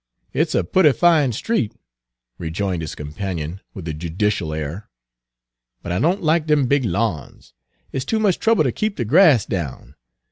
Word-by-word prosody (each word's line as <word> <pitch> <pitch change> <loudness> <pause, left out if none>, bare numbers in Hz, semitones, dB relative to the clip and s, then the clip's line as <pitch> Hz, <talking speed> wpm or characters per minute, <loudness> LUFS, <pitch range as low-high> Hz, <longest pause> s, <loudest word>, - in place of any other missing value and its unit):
"It's - - 0
a - - +2
pootty 150 - +4
fine 160 -5 +4
street," 115 - -1 0.7
rejoined 85 +2 -2
his 80 - -5
companion, 80 +3 -5
with 90 -4 -7
a 80 - -2
judicial 85 +2 -1
air, 80 +6 -5 0.9
"but 85 - -5
I 90 - 0
don't 175 +6 +1
like 160 0 +2
dem 150 -3 +3
big 140 0 +2
lawns. 95 - -3 0.4
It's 135 - -2
too 220 +11 -1
much 205 -5 +2
trouble 225 0 +3
ter - - +1
keep 215 -2 -2
de 120 - -2
grass 150 - +5
down. 70 -7 -5
105 Hz, 165 wpm, -21 LUFS, -, 0.9 s, grass